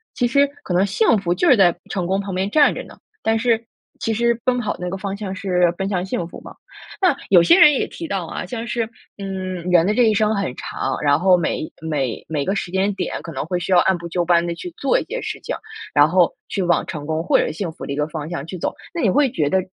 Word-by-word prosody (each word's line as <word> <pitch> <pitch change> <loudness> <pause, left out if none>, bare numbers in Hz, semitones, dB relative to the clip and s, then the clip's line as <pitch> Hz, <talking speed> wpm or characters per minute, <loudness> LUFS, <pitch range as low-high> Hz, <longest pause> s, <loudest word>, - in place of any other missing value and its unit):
其 245 - +1
实 280 +3 +3 0.2
可 180 - -3
能 180 +3 +3
幸 215 +3 +3
福 180 -3 0
就 345 - +2
是 255 - +6
在 180 -4 +5
成 180 -3 -2
功 190 +2 0
旁 195 -1 -5
边 190 +2 -1
站 290 +6 +4
着 - - -6
呢， - - -14 0.2
但 225 0 +1
是 230 0 +1 0.3
其 225 - -1
实 235 +1 +1
奔 250 -1 +2
跑 215 -4 -2
那 180 0 -3
个 195 - -3
方 195 0 -4
向 200 -2 -5
是 180 -3 +1
奔 195 +2 -3
向 180 -2 -1
幸 175 -3 -3
福 - - -10
嘛。 - - -11 0.5
那 365 -7 +4
有 180 -3 +7
些 340 - +5
人 295 - +8
也 270 - 0
提 335 - -7
到 190 - -3
啊， - - -5
像 230 +5 -5
是， 230 -1 -1 0.3
嗯， 190 -2 -4 0.2
人 175 0 +5
的 210 - +2
这 245 - +4
一 220 -2 +4
生 215 +1 +2
很 195 -11 -2
长， 135 0 -3
然 145 0 +3
后 185 +1 +5
每 160 -2 -2
每 145 -7 -2
每 150 -3 -1
个 195 - 0
时 195 - -3
间 190 +2 +1
点 - - -4
可 165 - -7
能 - - -3
会 180 +2 -2
需 175 - -4
要 180 - +6
按 190 0 +2
部 170 0 -7
就 175 +1 -1
班 170 0 +3
地 170 - -2
去 355 - -7
做 275 - +2
一 - - -4
些 - - -4
事 - - -4
情， - - -4 0.4
然 145 0 +7
后 175 0 +3
去 200 - -2
往 175 -2 +2
成 145 -2 -6
功 160 0 -1
或 180 - +3
者 - - 0
幸 170 +1 -4
福 - - -9
的 - - -5
一 - - -2
个 150 +1 -1
方 155 -1 -6
向 170 -5 -4
去 180 +2 -7
走， - - -2 0.2
那 340 - -2
你 225 - +3
会 270 +6 +3
觉 150 -8 0
得 190 - +2
190 Hz, 295 characters per minute, -21 LUFS, 170-220 Hz, 0.5 s, 人